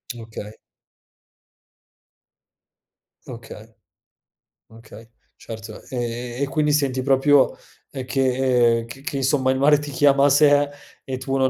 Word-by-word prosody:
Okay. 110 -2 -9 2.7
Okay. 115 -2 -11 1.0
Okay, 110 0 -15 0.3
certo. 110 -1 -10
Ehm, 120 +1 -4
e 140 - 0
quindi 150 -1 0
senti 135 -3 0
proprio 135 +1 +3 0.4
uhm, 130 -2 -6
che 125 -3 +1
c 135 +4 -11
che 140 - -5
insomma 130 0 +1
il 130 - -1
mare 150 +1 +5
ti 145 -1 -7
chiama 140 0 +3
a - - +5
sé 145 0 +4 0.4
e 130 -2 -4
tu 135 +1 -3
non 130 0 +2
130 Hz, 120 wpm, -22 LUFS, 115-140 Hz, 2.7 s, mare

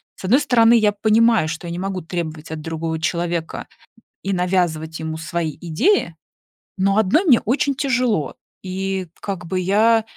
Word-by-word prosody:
С - - -9
одной 250 +10 +4
стороны, 235 -4 +4
я 215 -2 +3
понимаю, 220 -2 +3
что 165 +2 -5
я - - -5
не 175 - -4
могу 190 -1 -3
требовать 160 -2 -5
от 160 - -4
другого 160 0 -3
человека 170 0 -2 0.6
и 195 - -1
навязывать 175 -4 -1
ему 160 0 -4
свои 160 -1 -3
идеи, 170 - +1 0.6
но 195 +1 +2
одной 220 - +3
мне 260 -9 +6
очень 275 +4 0
тяжело. 255 - 0 0.3
И 190 0 -3
как 190 -4 -5
бы 185 +2 -2
я, 215 +4 +3
185 Hz, 160 wpm, -20 LUFS, 165-220 Hz, 0.6 s, мне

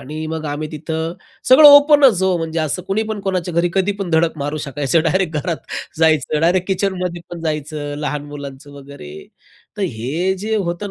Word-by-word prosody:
आणि 155 +3 -6
मग 160 0 -4
आम्ही 150 +1 -4
तिथं 160 +2 -4 0.4
सगळं 290 +4 +9
ओपन 285 0 +7
च 190 -5 -3
हो, 190 -1 +2
म्हणजे 165 0 -3
असं 155 +4 -2
कुणी 200 +3 0
पण 215 -2 -4
कोणाच्या 185 -3 -3
घरी 170 +1 +2
कधी 195 +1 +1
पण 190 -3 -3
धडक 160 0 +1
मारू 145 +2 -3
शकायचं, 145 +3 0
डायरेक्ट 175 -2 0
घरात 170 0 -2 0.4
जायचं, 155 -2 +2
डायरेक्ट 180 +3 +2
किचनमध्ये 180 -3 -2
पण 175 -1 -7
जायचं, 150 -2 -4
लहान 145 0 -3
मुलांचं 145 -1 -9
वगैरे. 135 - -11 0.5
तर - - -2
हे 165 +5 -2
जे 220 +1 -1
होतं 190 +1 -3
165 Hz, 180 wpm, -18 LUFS, 150-190 Hz, 0.5 s, सगळं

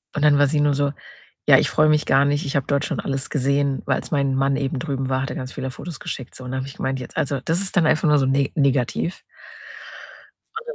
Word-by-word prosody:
und 150 - -1
dann 145 -1 +5
war 145 - +5
sie 150 +2 0
nur 145 -1 +3
so: 140 0 0 0.6
„Ja, - - +9
ich - - +1
freue 155 0 +3
mich 150 0 +3
gar 135 +1 +4
nicht, 145 +1 0
ich 140 - -2
habe 140 - 0
dort 140 +1 0
schon - - -2
alles 135 -1 -3
gesehen. 140 0 0
Als 130 - -1
mein 140 -3 +1
Mann 135 +1 +1
eben 135 -1 -2
drüben 135 0 -3
war, 130 0 0
hat 135 - -4
er - - -5
ganz 130 -1 -6
viele 130 - -4
Fotos 160 +3 -8
geschickt, 130 -2 -6
so.“ 130 - -9
Und 125 - -6
da 130 - -2
habe 130 - -4
ich 135 - -10
gemeint: 130 0 -2
„Jetzt 125 - -9
also, 140 0 0
das 165 +2 +1
ist 195 - -3
dann 170 -4 +4
einfach 155 +2 +2
nur 150 0 +5
so 135 - +1
ne 135 +1 +1
negativ.“ 140 +3 0 1.3
Und 450 +1 -7
dann 485 - -4
140 Hz, 270 wpm, -22 LUFS, 135-150 Hz, 1.3 s, Ja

